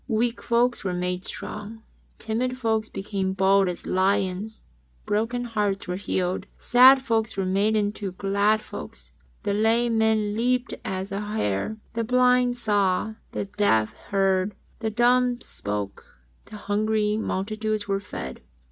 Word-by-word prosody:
Weak 235 Hz, 0 st, 0 dB
folks 240 Hz, +1 st, +1 dB
were 185 Hz, -2 st, -2 dB
made 180 Hz, +1 st, -2 dB
strong. 220 Hz, +2 st, -5 dB, 0.3 s
Timid 245 Hz, +3 st, -2 dB
folks 220 Hz, -3 st, 0 dB
became 195 Hz, -1 st, -3 dB
bold 195 Hz, 0 st, +3 dB
as 175 Hz, -, -6 dB
lions. 195 Hz, +2 st, 0 dB, 0.4 s
Broken 230 Hz, +4 st, 0 dB
hearts 210 Hz, -5 st, -1 dB
were 180 Hz, -, -2 dB
healed. 185 Hz, 0 st, -2 dB
Sad 260 Hz, +2 st, +6 dB
folks 225 Hz, -3 st, 0 dB
were 195 Hz, -, 0 dB
made 200 Hz, +4 st, +2 dB
into 205 Hz, -2 st, -1 dB
glad 200 Hz, +3 st, +1 dB
folks. -, -, -9 dB, 0.3 s
The 205 Hz, -2 st, 0 dB
lame 225 Hz, +2 st, +2 dB
man 215 Hz, -2 st, +2 dB
leaped 250 Hz, +2 st, 0 dB
as 190 Hz, +1 st, -4 dB
a 195 Hz, -, -2 dB
hart. 210 Hz, -, -2 dB, 0.2 s
The 230 Hz, 0 st, -1 dB
blind 250 Hz, +1 st, +3 dB
saw. 205 Hz, -2 st, +1 dB, 0.2 s
The -, -, -2 dB
deaf 195 Hz, -, +1 dB
heard. 195 Hz, 0 st, 0 dB, 0.2 s
The 220 Hz, -1 st, -1 dB
dumb 245 Hz, +2 st, +3 dB
spake. 100 Hz, -, -4 dB, 0.5 s
The 215 Hz, -, -11 dB
hungry 210 Hz, +1 st, 0 dB
multitudes 215 Hz, +1 st, -2 dB
were 195 Hz, -1 st, 0 dB
fed. 65 Hz, -, -7 dB
210 Hz, 140 wpm, -25 LUFS, 195-225 Hz, 0.5 s, Sad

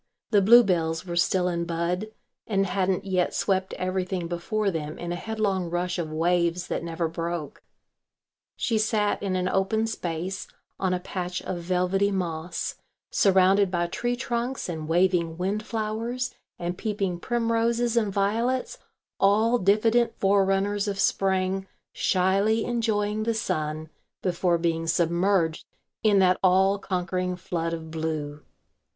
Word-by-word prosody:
The 205 Hz, -3 st, +5 dB
bluebells 185 Hz, -7 st, +4 dB
were 175 Hz, -1 st, -4 dB
still 180 Hz, +1 st, +2 dB
in 170 Hz, -1 st, -1 dB
bud 170 Hz, +4 st, -1 dB, 0.4 s
and 195 Hz, -2 st, +1 dB
hadn't 190 Hz, 0 st, 0 dB
yet 185 Hz, -2 st, 0 dB
swept 190 Hz, -1 st, 0 dB
everything 185 Hz, -1 st, -2 dB
before 195 Hz, +4 st, -1 dB
them 155 Hz, -2 st, -4 dB
in 175 Hz, 0 st, -5 dB
a -, -, -1 dB
headlong 195 Hz, -3 st, -1 dB
rush 175 Hz, +1 st, -2 dB
of 160 Hz, -2 st, -3 dB
waves 170 Hz, +2 st, +1 dB
that -, -, -2 dB
never 165 Hz, 0 st, -2 dB
broke. 165 Hz, -2 st, -4 dB, 0.9 s
She 225 Hz, -3 st, 0 dB
sat 215 Hz, -1 st, +1 dB
in 195 Hz, -2 st, -1 dB
an 180 Hz, 0 st, 0 dB
open 195 Hz, +4 st, +1 dB
space 185 Hz, -3 st, -4 dB, 0.3 s
on 190 Hz, -1 st, +1 dB
a -, -, -2 dB
patch 180 Hz, 0 st, -4 dB
of 180 Hz, -, -4 dB
velvety 180 Hz, +3 st, +1 dB
moss, 175 Hz, -3 st, -3 dB, 0.3 s
surrounded 195 Hz, 0 st, +4 dB
by 175 Hz, -1 st, 0 dB
tree 240 Hz, +8 st, -2 dB
trunks 245 Hz, 0 st, -3 dB
and 160 Hz, -3 st, -5 dB
waving 170 Hz, -1 st, +2 dB
windflowers 220 Hz, +5 st, -2 dB, 0.2 s
and 175 Hz, 0 st, -4 dB
peeping 200 Hz, -5 st, -2 dB
primroses 235 Hz, +1 st, 0 dB
and 215 Hz, -4 st, +2 dB
violets, 230 Hz, -, 0 dB, 0.4 s
all 220 Hz, +5 st, +4 dB
diffident 225 Hz, +4 st, +3 dB
forerunners 200 Hz, +1 st, +2 dB
of 200 Hz, -1 st, -2 dB
Spring, 190 Hz, 0 st, +1 dB, 0.3 s
shyly 195 Hz, +4 st, +2 dB
enjoying 215 Hz, -3 st, 0 dB
the 225 Hz, +1 st, 0 dB
sun 155 Hz, -6 st, -2 dB, 0.3 s
before 175 Hz, -1 st, +1 dB
being 165 Hz, -1 st, -1 dB
submerged 170 Hz, 0 st, +1 dB, 0.4 s
in 210 Hz, -2 st, +4 dB
that 185 Hz, -1 st, +4 dB
all 190 Hz, +2 st, +4 dB
conquering 185 Hz, -1 st, -2 dB
flood 165 Hz, -2 st, -3 dB
of 160 Hz, -1 st, -6 dB
blue. 155 Hz, -2 st, -3 dB
185 Hz, 135 wpm, -26 LUFS, 175-210 Hz, 0.9 s, The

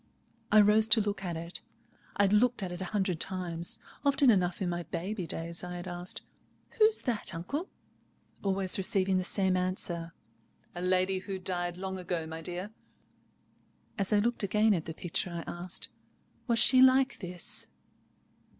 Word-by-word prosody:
I 215 Hz, 0 st, +8 dB
rose 210 Hz, +1 st, +5 dB
to 220 Hz, 0 st, +7 dB
look 205 Hz, -2 st, -2 dB
at 175 Hz, -3 st, -3 dB
it. 170 Hz, +2 st, -7 dB, 0.6 s
I 205 Hz, -, +4 dB
had 200 Hz, 0 st, +3 dB
looked 240 Hz, 0 st, +3 dB
at 180 Hz, -, -4 dB
it 175 Hz, +1 st, -6 dB
a -, -, -2 dB
hundred 190 Hz, -3 st, -1 dB
times. 175 Hz, -3 st, -1 dB, 0.3 s
Often 280 Hz, -2 st, +5 dB
enough 180 Hz, -4 st, +1 dB
in 190 Hz, -, -1 dB
my 175 Hz, 0 st, -2 dB
baby 185 Hz, +2 st, -4 dB
days 165 Hz, +2 st, -5 dB
I 180 Hz, 0 st, -5 dB
had 175 Hz, +1 st, -6 dB
asked, 175 Hz, 0 st, -4 dB, 0.6 s
"Who's 435 Hz, 0 st, +4 dB
that, 230 Hz, -8 st, -1 dB
uncle?" 280 Hz, -, -4 dB, 0.7 s
always 195 Hz, -1 st, +2 dB
receiving 190 Hz, 0 st, +1 dB
the 185 Hz, -, 0 dB
same 190 Hz, 0 st, +1 dB
answer: 175 Hz, -2 st, -2 dB, 0.6 s
"A 175 Hz, -, -6 dB
lady 185 Hz, +1 st, +2 dB
who 195 Hz, 0 st, -5 dB
died 175 Hz, -1 st, -2 dB
long 190 Hz, 0 st, -4 dB
ago, 175 Hz, -2 st, -3 dB
my 160 Hz, 0 st, -7 dB
dear." 180 Hz, +5 st, -5 dB, 1.2 s
As 200 Hz, -3 st, -2 dB
I 210 Hz, -, +4 dB
looked 235 Hz, +4 st, +1 dB
again 210 Hz, +2 st, +3 dB
at 170 Hz, -4 st, -2 dB
the 160 Hz, -, -6 dB
picture, 175 Hz, +1 st, -2 dB
I 170 Hz, -1 st, -5 dB
asked, 175 Hz, +1 st, -6 dB, 0.6 s
"Was 235 Hz, -2 st, +2 dB
she 255 Hz, +2 st, +6 dB
like 260 Hz, +1 st, +5 dB
this?" 180 Hz, -3 st, -3 dB
185 Hz, 170 wpm, -30 LUFS, 175-210 Hz, 1.2 s, I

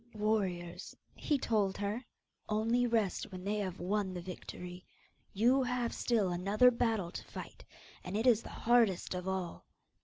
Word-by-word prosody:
'Warriors,' 195 Hz, -5 st, -1 dB, 0.2 s
he 295 Hz, -, 0 dB
told 210 Hz, -6 st, +1 dB
her, 205 Hz, +5 st, -2 dB, 0.5 s
'only 230 Hz, +3 st, +2 dB
rest 220 Hz, -4 st, 0 dB
when 185 Hz, -1 st, -7 dB
they 205 Hz, +2 st, -1 dB
have 190 Hz, -3 st, -3 dB
won 190 Hz, +1 st, -1 dB
the -, -, -3 dB
victory. 180 Hz, 0 st, -8 dB, 0.5 s
You 245 Hz, +7 st, +4 dB
have 250 Hz, -2 st, -1 dB
still 215 Hz, -6 st, +1 dB
another 200 Hz, +8 st, +4 dB
battle 225 Hz, -7 st, 0 dB
to -, -, -6 dB
fight, -, -, -9 dB, 0.4 s
and 185 Hz, +3 st, -3 dB
it 225 Hz, -, 0 dB
is 235 Hz, -3 st, +5 dB
the -, -, -10 dB
hardest 230 Hz, -7 st, +2 dB
of 180 Hz, 0 st, -4 dB
all. 190 Hz, -2 st, -3 dB
205 Hz, 155 wpm, -33 LUFS, 185-230 Hz, 0.5 s, is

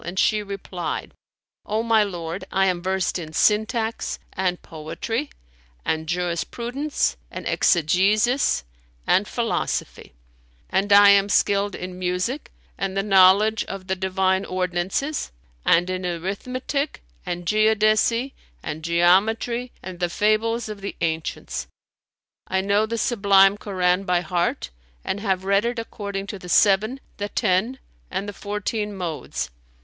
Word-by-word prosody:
and 175 Hz, +2 st, -6 dB
she 215 Hz, +2 st, +3 dB
replied, 195 Hz, -4 st, -5 dB, 0.5 s
"O 215 Hz, +2 st, -1 dB
my 225 Hz, -2 st, +4 dB
lord, 175 Hz, -2 st, -5 dB
I 195 Hz, 0 st, +3 dB
am 180 Hz, -2 st, 0 dB
versed 190 Hz, 0 st, -1 dB
in 155 Hz, -2 st, -8 dB
syntax 220 Hz, +4 st, +1 dB, 0.2 s
and 180 Hz, -1 st, -1 dB
poetry 165 Hz, -, -4 dB, 0.6 s
and 160 Hz, 0 st, -1 dB
jurisprudence 180 Hz, -, -1 dB
and -, -, -6 dB
exegesis 200 Hz, -, +2 dB, 0.4 s
and -, -, +3 dB
philosophy; -, -, -3 dB, 0.6 s
and 195 Hz, +2 st, +1 dB
I 200 Hz, 0 st, +9 dB
am 200 Hz, 0 st, +5 dB
skilled 200 Hz, +1 st, +2 dB
in 180 Hz, 0 st, -7 dB
music 185 Hz, +10 st, -2 dB, 0.3 s
and 195 Hz, 0 st, -2 dB
the 195 Hz, -, +1 dB
knowledge 200 Hz, +2 st, +5 dB
of 195 Hz, -1 st, -7 dB
the 190 Hz, 0 st, -1 dB
Divine 190 Hz, 0 st, +1 dB
ordinances 185 Hz, -, -2 dB, 0.4 s
and 175 Hz, +2 st, +4 dB
in 185 Hz, 0 st, -3 dB
arithmetic 225 Hz, -, -3 dB, 0.2 s
and 175 Hz, 0 st, -4 dB
geodesy 215 Hz, +5 st, +2 dB, 0.3 s
and 155 Hz, +1 st, -5 dB
geometry 210 Hz, +9 st, +2 dB
and 185 Hz, -1 st, -8 dB
the 175 Hz, -1 st, 0 dB
fables 220 Hz, +4 st, +1 dB
of 210 Hz, -2 st, -7 dB
the 200 Hz, -, -5 dB
ancients. 160 Hz, -1 st, -3 dB, 0.8 s
I 190 Hz, 0 st, +1 dB
know 200 Hz, +2 st, +2 dB
the 230 Hz, +1 st, -3 dB
Sublime 200 Hz, -4 st, +4 dB
Koran 185 Hz, -2 st, 0 dB
by 180 Hz, -2 st, +2 dB
heart 175 Hz, -, -1 dB, 0.3 s
and 200 Hz, -, -2 dB
have 190 Hz, -3 st, -1 dB
read 200 Hz, +1 st, +3 dB
it 240 Hz, 0 st, -1 dB
according 200 Hz, -3 st, -5 dB
to 200 Hz, -1 st, -7 dB
the 180 Hz, -, -10 dB
seven, 215 Hz, +8 st, +3 dB, 0.2 s
the 205 Hz, 0 st, -3 dB
ten 205 Hz, +8 st, +1 dB, 0.3 s
and 195 Hz, +2 st, -3 dB
the 205 Hz, -, -5 dB
fourteen 210 Hz, +1 st, -3 dB
modes. 165 Hz, -, -4 dB
195 Hz, 135 wpm, -23 LUFS, 180-215 Hz, 0.8 s, I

